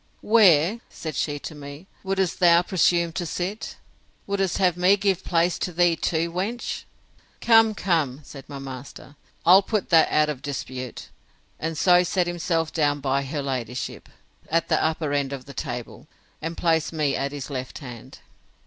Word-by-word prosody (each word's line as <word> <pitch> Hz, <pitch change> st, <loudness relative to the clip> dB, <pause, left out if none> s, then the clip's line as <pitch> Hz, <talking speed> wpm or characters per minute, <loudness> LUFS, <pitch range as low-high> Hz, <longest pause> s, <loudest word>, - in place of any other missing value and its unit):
Where, 205 Hz, -2 st, +5 dB
said 155 Hz, -3 st, -7 dB
she 145 Hz, +1 st, -1 dB
to 150 Hz, -, -7 dB
me, 145 Hz, +3 st, -10 dB, 0.2 s
would'st 190 Hz, -2 st, -1 dB
thou 175 Hz, -1 st, +6 dB
presume 175 Hz, -2 st, +2 dB
to 175 Hz, -, -2 dB
sit? 190 Hz, +7 st, -4 dB, 0.5 s
Would'st 195 Hz, -2 st, -1 dB
have 180 Hz, -3 st, +2 dB
me 180 Hz, +3 st, +4 dB
give 195 Hz, -2 st, 0 dB
place 170 Hz, -1 st, +1 dB
to 180 Hz, -, -2 dB
thee 175 Hz, 0 st, +3 dB
too, 165 Hz, +1 st, -1 dB
wench?—Come, 225 Hz, +2 st, 0 dB
come, 155 Hz, -8 st, 0 dB
said 135 Hz, 0 st, -12 dB
my 140 Hz, -, -6 dB
master, 135 Hz, +1 st, -9 dB, 0.3 s
I'll 185 Hz, +3 st, +8 dB
put 210 Hz, 0 st, -2 dB
that 165 Hz, -2 st, +6 dB
out 150 Hz, 0 st, +3 dB
of 145 Hz, -4 st, -4 dB
dispute; 130 Hz, -3 st, -6 dB, 0.5 s
and 160 Hz, 0 st, -3 dB
so 180 Hz, +1 st, +5 dB
set 180 Hz, 0 st, 0 dB
himself 165 Hz, -2 st, -1 dB
down 145 Hz, -2 st, +1 dB
by 140 Hz, 0 st, 0 dB
her 145 Hz, +1 st, -3 dB
ladyship, 125 Hz, -2 st, -4 dB, 0.4 s
at 165 Hz, +1 st, +1 dB
the -, -, +2 dB
upper 155 Hz, -2 st, -1 dB
end 140 Hz, -1 st, 0 dB
of 130 Hz, -2 st, -7 dB
the 140 Hz, -, -11 dB
table, 120 Hz, -2 st, -6 dB, 0.3 s
and 165 Hz, +1 st, -4 dB
placed 165 Hz, -2 st, +1 dB
me 150 Hz, -4 st, 0 dB
at 140 Hz, 0 st, -2 dB
his 145 Hz, 0 st, -7 dB
left 130 Hz, -1 st, -5 dB
hand. 125 Hz, -5 st, -10 dB
160 Hz, 165 wpm, -24 LUFS, 140-180 Hz, 0.5 s, I'll